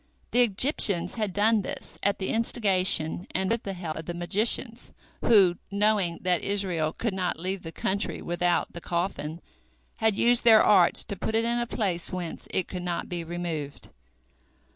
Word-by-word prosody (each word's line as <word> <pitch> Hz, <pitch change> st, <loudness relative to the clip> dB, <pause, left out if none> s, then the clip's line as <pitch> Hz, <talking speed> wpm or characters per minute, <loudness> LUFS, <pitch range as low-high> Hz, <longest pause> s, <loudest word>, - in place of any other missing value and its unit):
The 245 Hz, -, +3 dB
Egyptians 200 Hz, -, +3 dB
had 215 Hz, -4 st, -2 dB
done 210 Hz, +3 st, +2 dB
this -, -, -7 dB
at 200 Hz, 0 st, 0 dB
the 190 Hz, -, -4 dB
instigation 190 Hz, -7 st, +1 dB
and 190 Hz, +1 st, 0 dB
with 230 Hz, 0 st, 0 dB
the 195 Hz, -, -5 dB
help 170 Hz, -3 st, -6 dB
of 160 Hz, -, -7 dB
the 175 Hz, -, -5 dB
magicians, 220 Hz, +6 st, +2 dB, 0.3 s
who, 195 Hz, -6 st, +5 dB
knowing 200 Hz, -4 st, +1 dB
that 180 Hz, -1 st, +1 dB
Israel 185 Hz, -6 st, -1 dB
could 225 Hz, +4 st, -3 dB
not 180 Hz, -3 st, -2 dB
leave 185 Hz, +2 st, -4 dB
the 165 Hz, -, -8 dB
country 200 Hz, +4 st, -2 dB
without 175 Hz, 0 st, -1 dB
the 170 Hz, -, -8 dB
coffin, 170 Hz, -2 st, -3 dB, 0.6 s
had 220 Hz, -2 st, +1 dB
used 240 Hz, 0 st, +3 dB
their 225 Hz, -2 st, +7 dB
arts 185 Hz, -4 st, +5 dB
to 200 Hz, -, -5 dB
put 220 Hz, +3 st, -3 dB
it 225 Hz, +1 st, +1 dB
in 235 Hz, +1 st, 0 dB
a 240 Hz, -, -2 dB
place 190 Hz, -8 st, -2 dB
whence 180 Hz, -3 st, -6 dB
it 185 Hz, -, -2 dB
could 180 Hz, -, -6 dB
not 175 Hz, -1 st, -4 dB
be 175 Hz, -1 st, -4 dB
removed. 165 Hz, -4 st, -6 dB
190 Hz, 175 wpm, -26 LUFS, 175-215 Hz, 0.6 s, their